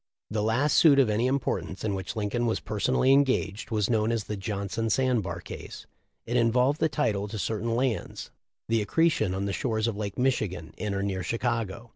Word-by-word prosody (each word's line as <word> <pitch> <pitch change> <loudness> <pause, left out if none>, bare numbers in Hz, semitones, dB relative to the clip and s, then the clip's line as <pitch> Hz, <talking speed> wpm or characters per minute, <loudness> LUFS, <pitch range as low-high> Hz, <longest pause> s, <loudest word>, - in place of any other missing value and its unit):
"* - - -67
The 105 -1 0
last 120 +7 +2
suit 150 -4 +7
of 130 -6 +4
any 115 +4 +1
importance 100 -9 -2
in 105 -2 0
which 95 -1 -4
Lin 105 -2 -2
coln 120 +1 0
was 115 - 0
personally 130 +5 +1
engaged, 130 -7 +1
was 105 -4 +1
known 110 -1 +1
as 115 -2 -1
the 105 - -4
Johnson 100 +2 -3
sand 125 0 +2
bar 85 -3 -5
case. - - -9 0.4
It 120 +2 0
involved 125 +5 +3
the 160 - +2
title 105 -10 0
to 110 +1 -6
certain 115 +2 -1
lands, 125 -2 -2 0.4
the 115 -1 +2
accretion 155 - +1
on 95 +1 -2
the 100 - -2
shores 110 -2 -1
of 115 -3 -1
Lake 100 -1 -4
Michigan, 110 -10 -1
in 105 -2 -3
or 100 - -1
near 95 -2 -2
Chicago. 115 +2 -2
110 Hz, 205 wpm, -27 LUFS, 100-125 Hz, 0.4 s, suit